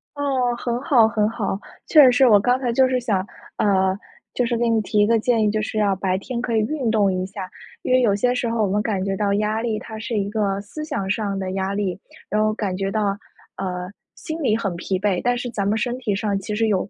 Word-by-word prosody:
哦， 265 -4 0
很 240 0 -2
好， 255 -6 +5
很 215 -1 +1
好， 210 -4 -3 0.3
确 305 -2 +7
实 255 - +7
是 255 +1 +5
我 210 -4 +7
刚 245 +5 +2
才 250 -3 -1
就 260 +2 +4
是 255 -1 +1
想 225 -6 0 0.4
呃， 190 -2 +2 0.4
就 245 - +1
是 235 0 0
给 235 +1 +1
你 225 -1 +2
提 210 0 -1
一 205 - +5
个 230 0 +3
建 230 0 +2
议， 210 - +2
就 215 0 -1
是 215 - -4
要 205 -2 +2
白 190 0 -1
天 235 +4 -4
可 235 -2 -1
以 - - +4
运 255 +2 -1
动 205 -3 +2
一 185 0 -2
下， 190 -1 -7 0.3
因 - - 0
为 255 - +5
有 210 -5 +3
些 245 +5 +1
时 250 -2 -1
候 230 -1 0
我 - - +2
们 205 +2 0
感 205 -3 -1
觉 195 0 -1
到 200 0 0
压 215 +2 0
力， 225 -2 -1
它 220 0 -8
是 225 +1 -3
一 200 -1 0
个 205 -2 -1
思 225 +10 -8
想 285 -11 -3
上 205 -1 -1
的 190 -1 -3
压 190 +1 -2
力， 195 -3 -2 0.3
然 210 - +1
后 215 - +2
感 205 -4 -2
觉 195 +1 -2
到， 205 -2 0 0.4
呃， 180 -1 -4 0.2
心 320 +1 -6
里 225 -6 +2
很 195 -6 -2
疲 185 +2 -2
惫， 195 -2 0
但 245 0 +1
是 245 0 -4
咱 200 -3 -2
们 210 +2 +1
身 240 +3 -2
体 220 -6 -1
上 205 0 -1
其 210 +2 -4
实 225 +1 +1
有 195 -2 0
215 Hz, 280 characters per minute, -22 LUFS, 195-240 Hz, 0.4 s, 确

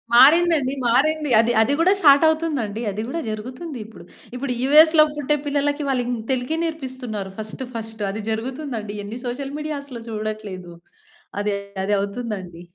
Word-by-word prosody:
మారిందండి. 295 0 +6
మారింది. 300 +5 +2
అది 230 +1 +3
అది 260 +6 +2
గూడా 365 +4 +5
స్టార్ట్ 285 0 +7
అవుతుందండి. 290 -10 -1
అది 210 +2 -4
గూడా 330 +6 -3
జరుగుతుంది 255 +8 -6
ఇప్పుడు. 220 -5 -13 0.3
ఇప్పుడు 250 0 -2
యూఎస్‌లో 310 +3 +7
పుట్టే 295 0 +1
పిల్లలకి 285 +1 0
వాళ్ళిం 245 -2 0 0.2
తెలుగే 260 +5 -1
నేర్పిస్తున్నారు 260 - -4
ఫస్ట్ 215 +4 -6
ఫస్ట్. 220 -1 -5
అది 215 +2 -5
జరుగుతుందండి. 230 -2 -4
ఎన్ని 220 +4 -7
సోషల్ 270 +3 -4
మీడియాస్‌లో 280 -5 -5
చూడట్లేదు. 210 -5 -5 0.7
అది 205 0 0 0.3
అది 205 +1 +1
అవుతుందండి. 200 -5 -5
250 Hz, 135 wpm, -22 LUFS, 215-295 Hz, 0.7 s, స్టార్ట్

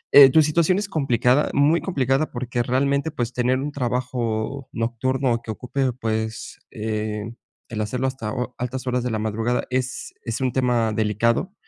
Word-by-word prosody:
eh, 140 -2 +10
tu 160 +3 +6
situación 170 +4 +2
es 205 -1 -2
complicada, 135 - +2
muy 150 +4 +4
complicada 135 -3 0
porque 120 -1 -2
realmente, 140 +5 +1
pues, 120 -3 -3
tener 125 +1 +1
un 145 +2 -3
trabajo 125 -1 -2
nocturno 120 +2 0
que 115 - -7
ocupe, 130 +3 -1
pues, 110 -2 -3
eh, 110 0 -3 0.4
el 110 -2 -4
hacerlo 125 +5 -1
hasta 130 -5 -3
ho 125 -1 -3
altas 125 +1 -4
horas 125 0 0
de 125 - -2
la 110 - -1
madrugada 110 +3 -1
es 130 0 -2
es 115 +1 -3
un 130 -1 +1
tema 120 -4 +1
delicado, 110 - +1
125 Hz, 165 wpm, -23 LUFS, 115-135 Hz, 0.4 s, eh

